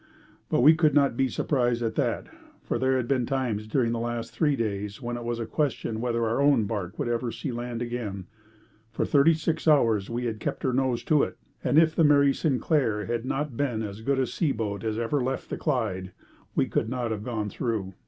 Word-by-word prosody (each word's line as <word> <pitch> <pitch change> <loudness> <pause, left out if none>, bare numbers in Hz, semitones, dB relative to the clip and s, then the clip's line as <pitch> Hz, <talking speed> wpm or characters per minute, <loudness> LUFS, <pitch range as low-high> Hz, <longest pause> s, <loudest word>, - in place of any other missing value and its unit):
But - - +2
we 150 +5 +8
could 155 -3 +2
not 140 -4 +4
be 135 +2 +2
surprised 120 -5 0
at 115 -1 -1
that, - - -1 0.4
for - - -2
there 130 0 +2
had 125 -2 -2
been 125 -3 +1
times 120 -6 -1
during 115 +1 +1
the 115 - -1
last 120 0 -3
three 150 -3 +2
days 105 -2 -3
when 120 -2 -4
it 120 - -5
was 120 0 -2
a 115 - -2
question 120 -5 -2
whether 115 -1 0
our 115 +4 0
own 140 -5 +4
barque 100 -2 -4
would - - -2
ever 120 0 -1
see 135 - -4
land 120 0 -4
again. 110 -6 -4 0.6
For - - -1
thirty 150 +3 +4
six 160 +1 -2
hours 115 -10 +4
we 120 +1 -2
had 110 -2 -3
kept - - -4
her 130 - +1
nose 130 -2 0
to 150 -2 +3
it, - - -2 0.3
and - - +2
if 160 0 +5
the 165 - +4
Mary 140 -2 +5
Sinclair 130 -7 0
had 120 0 -2
not 135 0 -2
been 120 -4 -1
as 105 0 -6
good 135 +4 0
a 130 - +2
seaboat 110 - -2
as 110 -1 -2
ever 120 +5 0
left 130 +1 -3
the - - -2
Clyde, 100 - -2 0.4
we - - +3
could 110 - -1
not 125 -2 -2
have 105 -2 -3
gone 110 -4 -3
through. 110 -6 -3
120 Hz, 220 wpm, -27 LUFS, 110-135 Hz, 0.6 s, we